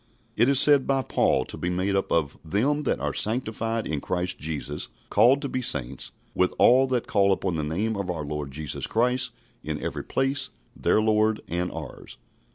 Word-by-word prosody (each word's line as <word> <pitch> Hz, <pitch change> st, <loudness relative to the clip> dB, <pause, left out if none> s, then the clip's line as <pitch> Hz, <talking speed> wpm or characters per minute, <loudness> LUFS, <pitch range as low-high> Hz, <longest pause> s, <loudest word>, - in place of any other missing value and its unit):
It 115 Hz, +4 st, +4 dB
is 140 Hz, -2 st, +4 dB
said 145 Hz, -2 st, +6 dB
by 135 Hz, -1 st, +1 dB
Paul -, -, +1 dB
to -, -, -7 dB
be 90 Hz, -, -2 dB
made 95 Hz, +2 st, 0 dB
up 95 Hz, -, -1 dB
of 80 Hz, -4 st, +1 dB
"them 135 Hz, -, 0 dB
that -, -, 0 dB
are -, -, -2 dB
sanctified 115 Hz, 0 st, -1 dB
in 75 Hz, -3 st, -3 dB
Christ 90 Hz, 0 st, -2 dB
Jesus, 75 Hz, -2 st, -4 dB, 0.2 s
called 125 Hz, +7 st, +5 dB
to -, -, -1 dB
be 130 Hz, -1 st, -3 dB
saints, 65 Hz, -, 0 dB, 0.2 s
with 90 Hz, 0 st, +1 dB
all 130 Hz, +2 st, +5 dB
that 125 Hz, -2 st, -1 dB
call 100 Hz, -1 st, +2 dB
upon 95 Hz, -2 st, 0 dB
the 75 Hz, -, -2 dB
name 100 Hz, +9 st, -1 dB
of 100 Hz, -2 st, -4 dB
our 80 Hz, -4 st, -3 dB
Lord 75 Hz, -1 st, -4 dB
Jesus 75 Hz, +1 st, -3 dB
Christ 125 Hz, +2 st, +1 dB, 0.3 s
in -, -, -4 dB
every -, -, -4 dB
place, 135 Hz, +1 st, -1 dB, 0.3 s
their -, -, +2 dB
Lord 110 Hz, 0 st, +2 dB
and 90 Hz, +1 st, -2 dB
ours." -, -, -9 dB
105 Hz, 190 wpm, -25 LUFS, 85-125 Hz, 0.3 s, said